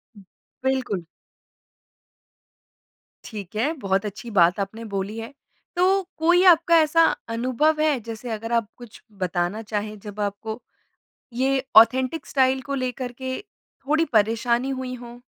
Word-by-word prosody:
उ -, -, -14 dB, 0.4 s
बिल्कुल। 255 Hz, -10 st, -1 dB, 2.2 s
ठीक 210 Hz, -3 st, -8 dB
है। 245 Hz, +8 st, +1 dB
बहुत 195 Hz, -1 st, 0 dB
अच्छी 210 Hz, +3 st, -6 dB
बात 175 Hz, -1 st, +4 dB
आपने 200 Hz, +3 st, -4 dB
बोली 195 Hz, +3 st, -3 dB
है। 225 Hz, +4 st, -7 dB, 0.4 s
तो 380 Hz, +2 st, +3 dB
कोई 345 Hz, +3 st, +4 dB
आपका 335 Hz, -1 st, +6 dB
ऐसा 320 Hz, +2 st, +4 dB, 0.3 s
अनुभव 255 Hz, +7 st, +1 dB
है? 300 Hz, -5 st, +2 dB
जैसे 230 Hz, +2 st, -7 dB
अगर 225 Hz, +1 st, -4 dB
आप 230 Hz, -3 st, +1 dB
कुछ 240 Hz, -3 st, -13 dB, 0.2 s
बताना 180 Hz, +3 st, -1 dB
चाहे। 215 Hz, 0 st, -4 dB
जब 205 Hz, 0 st, -8 dB
आपको 220 Hz, +3 st, -4 dB, 0.7 s
ये 265 Hz, +2 st, +1 dB
ऑथेंटिक 255 Hz, +7 st, +5 dB
स्टाइल 265 Hz, -1 st, +2 dB
को 280 Hz, +3 st, -4 dB
लेकर 255 Hz, -1 st, -3 dB
के 260 Hz, +1 st, -5 dB, 0.5 s
थोड़ी 315 Hz, +2 st, +3 dB
परेशानी 230 Hz, +4 st, +2 dB
हुईं 260 Hz, -1 st, -4 dB
हों? 240 Hz, 0 st, -11 dB
240 Hz, 135 wpm, -24 LUFS, 215-265 Hz, 2.2 s, आपका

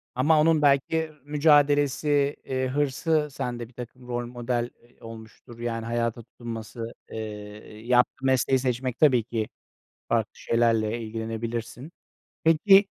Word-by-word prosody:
Ama 150 Hz, +5 st, +4 dB
onun 155 Hz, -1 st, +4 dB
belki 150 Hz, +3 st, +2 dB
mücadelesi, 145 Hz, -1 st, +3 dB
eee, 130 Hz, 0 st, -1 dB
hırsı 145 Hz, +3 st, +1 dB
sende 120 Hz, -2 st, -4 dB
birtakım 125 Hz, +1 st, -10 dB
rol 120 Hz, 0 st, -2 dB
model, 120 Hz, 0 st, -2 dB
eee, 120 Hz, +1 st, -25 dB
olmuştur, 115 Hz, +1 st, -12 dB
yani 115 Hz, -1 st, -3 dB
hayata 115 Hz, 0 st, -1 dB
tutunması, 115 Hz, 0 st, -7 dB, 0.2 s
eee, 105 Hz, 0 st, -8 dB
yaptığı 125 Hz, +2 st, +2 dB
mesleği 130 Hz, 0 st, +3 dB
seçmek 125 Hz, -1 st, -2 dB
tabii 130 Hz, -7 st, +5 dB
ki 115 Hz, -2 st, -3 dB, 0.6 s
farklı 115 Hz, -2 st, +1 dB
şeylerle 115 Hz, -1 st, +1 dB
ilgilenebilirsin. 115 Hz, +4 st, -5 dB, 0.5 s
Peki 195 Hz, +5 st, +6 dB
120 Hz, 115 wpm, -26 LUFS, 115-145 Hz, 0.6 s, Peki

